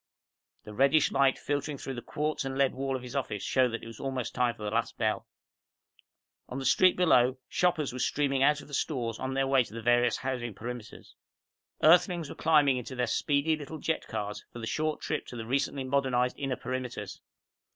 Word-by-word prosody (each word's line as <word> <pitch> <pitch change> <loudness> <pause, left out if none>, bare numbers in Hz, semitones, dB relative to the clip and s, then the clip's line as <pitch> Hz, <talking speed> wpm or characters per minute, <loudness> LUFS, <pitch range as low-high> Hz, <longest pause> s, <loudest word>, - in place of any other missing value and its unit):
The 105 - -10
reddish 140 +6 +4
light 135 -1 +3
filtering 145 0 -2
in - - -9
through 135 - -5
the 120 - -6
quartz 150 +3 -2
and 135 0 -4
lead 140 -1 +3
wall 135 0 -2
of 130 - -5
his 125 +1 -8
office 115 -7 -2
showed 130 -1 +3
that 115 - -5
it - - -7
was 115 -1 -10
almost 130 -3 -3
time 120 -1 +1
for 105 - -10
the 105 - -2
last 115 +1 -1
bell. 110 -2 -1 1.2
On 125 - -5
the 135 - -4
street 185 +5 +5
below, 130 -8 +4
shoppers 170 -7 +1
were 130 - -5
streaming 140 0 +1
out 145 +1 +4
of - - -14
the 145 - -14
stores 120 -6 -2
on 130 0 -3
their 135 0 +2
way 135 -1 +4
to 110 - -14
the - - -4
various 120 0 +3
housing 125 -4 -3
perimeters. 120 -1 -8 0.7
Earthlings 175 -1 +5
were - - -7
climbing 150 -5 +4
into 125 +1 -6
their 125 0 +1
speedy 145 +6 +1
little 155 +1 -7
jet 160 +2 -2
cars 105 0 -4
for - - -10
the 115 - -5
short 155 +6 -1
trip - - -3
to - - -8
the 115 -1 -5
recently 135 +2 -1
modernized 130 -2 +1
inner 135 -2 -1
perimeters. 130 -1 -5
130 Hz, 210 wpm, -29 LUFS, 120-145 Hz, 1.2 s, street